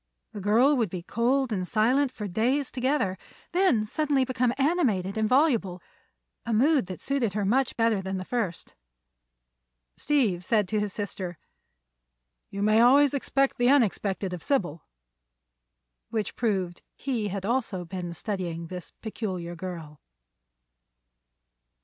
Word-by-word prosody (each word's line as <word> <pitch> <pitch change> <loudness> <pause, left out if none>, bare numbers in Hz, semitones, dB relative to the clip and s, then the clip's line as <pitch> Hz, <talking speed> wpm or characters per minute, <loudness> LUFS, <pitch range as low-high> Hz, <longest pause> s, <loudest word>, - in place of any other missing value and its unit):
The 205 - -7
girl 235 +9 +4
would 225 -5 +1
be 175 -1 -6
cold 250 +5 +1
and 185 -3 -2
silent 250 +7 +2
for 210 -5 -6
days 250 +9 0
together; 250 -8 0 0.3
then 345 - +3
suddenly 280 +3 +1
become 255 -1 +1
animated 265 - +1
and 220 -1 0
voluble—a 195 - -1
mood 265 - +3
that 185 -3 -7
suited 260 -8 -1
her 210 -2 0
much 255 +6 +1
better 225 -3 +2
than 190 0 -3
the 185 - -5
first. 220 -8 -3 1.2
Steve 230 -12 +1
said 210 0 +2
to 215 - 0
his 210 -1 -2
sister: 185 -4 -5 1.1
"You 200 +1 -4
may 215 +2 +4
always 275 +4 +6
expect 275 -1 0
the 245 0 +4
unexpected 205 -7 +1
of 175 - -6
Sybil." 175 - -1 1.3
Which 215 -3 -3
proved 190 -7 -1
he 240 -6 -2
had 195 -1 -4
also 220 -6 -1
been 175 0 -5
studying 175 -3 -4
this 180 -2 -7
peculiar 185 -6 -4
girl. 165 -4 -8
215 Hz, 130 wpm, -27 LUFS, 185-255 Hz, 1.3 s, always